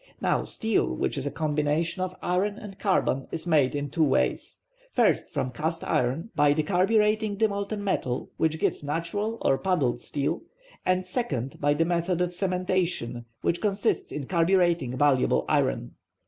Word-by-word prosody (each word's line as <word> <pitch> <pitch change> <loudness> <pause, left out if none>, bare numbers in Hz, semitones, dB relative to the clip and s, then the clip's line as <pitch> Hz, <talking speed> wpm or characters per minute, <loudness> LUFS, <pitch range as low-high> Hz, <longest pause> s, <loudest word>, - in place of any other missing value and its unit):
Now - - +1
steel, 225 -1 0
which - - -1
is 140 0 -3
a - - +1
combination 150 +3 -1
of 185 0 -2
iron 195 +4 0
and 200 -3 -10
carbon, 160 -9 +1
is 165 0 -3
made 150 -6 +3
in 145 -1 -3
two 165 - +2
ways: 140 -3 0 0.3
first - - +2
from 130 - -2
cast 160 +5 -3
iron, 135 - 0
by 145 -3 +4
decarburetting 210 +6 +2
the 220 +1 +4
molten 200 0 -3
metal, 130 -10 -2
which 160 0 +1
gives - - 0
natural 170 +9 -2
or 135 - +3
puddled 165 -10 0
steel; 145 +3 -2 0.5
and, 185 0 +2
second, 155 - -3
by 145 0 +3
the 165 +2 +2
method 170 +1 0
of 180 0 +1
cementation, 180 -9 -1 0.2
which 170 - 0
consists 200 -2 0
in 145 -2 -4
carburetting 170 -6 +2
malleable 130 - +3
iron. - - +1
170 Hz, 160 wpm, -27 LUFS, 145-190 Hz, 0.5 s, by